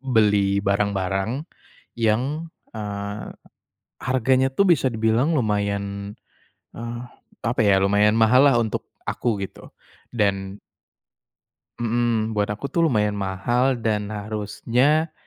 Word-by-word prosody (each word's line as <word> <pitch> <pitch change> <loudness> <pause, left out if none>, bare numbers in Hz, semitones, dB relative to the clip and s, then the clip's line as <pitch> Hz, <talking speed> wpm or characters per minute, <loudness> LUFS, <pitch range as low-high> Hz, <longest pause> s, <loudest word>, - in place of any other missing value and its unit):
beli 105 -6 +2
barang-barang, 100 +4 0 0.5
yang, 130 +9 0 0.2
eee, 100 -1 -5 0.7
harganya 130 +1 +2
tuh 200 - +3
bisa 165 -7 +4
dibilang 115 +8 +2
lumayan, 100 -2 -2 0.6
eee, 120 0 -6 0.4
apa 115 +2 -1
ya 100 -2 +4
lumayan 105 +2 +3
mahal 125 +4 +6
lah 135 - +4
untuk 110 -3 -3 0.2
aku 115 -4 -1
gitu 95 - -8 0.4
dan 100 -2 -1 1.2
Mhm, 115 -1 0
buat 105 -1 0
aku 105 +7 -5
tuh 165 -1 +3
lumayan 105 -4 +1
mahal 110 +7 0
dan 105 -2 0
harusnya, 110 +9 0
110 Hz, 105 wpm, -23 LUFS, 100-125 Hz, 1.2 s, mahal